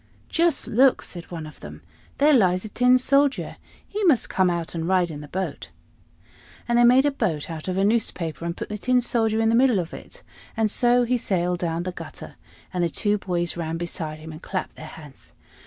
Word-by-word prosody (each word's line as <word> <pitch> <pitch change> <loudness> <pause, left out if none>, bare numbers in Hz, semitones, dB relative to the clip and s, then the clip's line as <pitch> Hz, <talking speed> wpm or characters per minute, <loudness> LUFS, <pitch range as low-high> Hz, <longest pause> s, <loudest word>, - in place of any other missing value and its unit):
"Just 335 -2 +1
look!" 260 +3 +3
said 175 -2 -7
one 165 -3 -6
of 155 - -12
them: - - -11 0.3
"there 295 +2 +5
lies 185 -6 +3
a - - -6
Tin 250 +3 +4
Soldier. 275 +2 +1 0.3
He 420 +1 -4
must 295 -10 +3
come 185 -1 +2
out 170 -1 -3
and 165 -1 -3
ride 180 -2 +2
in 145 -1 -7
the 150 - -10
boat." 190 +5 -5 1.0
And 240 0 +2
they - - +6
made 250 +3 +6
a 290 - +3
boat 175 - -2
out 160 +1 -7
of 185 0 -2
a 195 - +2
newspaper, 195 -7 -1
and 170 0 -3
put - - -6
the 210 0 -5
Tin 250 +3 +2
Soldier 225 -2 0
in 225 0 +2
the - - +2
middle 245 -2 +4
of 170 -3 -3
it, - - -11 0.3
and 220 -2 +1
so 245 +1 +3
he 245 +1 0
sailed 180 -4 -1
down 170 0 -2
the 185 - -3
gutter, - - -10 0.4
and 180 -1 0
the 170 - +1
two 205 +5 0
boys 175 -3 -2
ran 165 -1 -3
beside 165 -2 -5
him 160 +1 -10
and 155 +1 -10
clapped 185 -1 -4
their 155 - -9
hands. 150 -3 -13
190 Hz, 220 wpm, -24 LUFS, 170-240 Hz, 1.0 s, they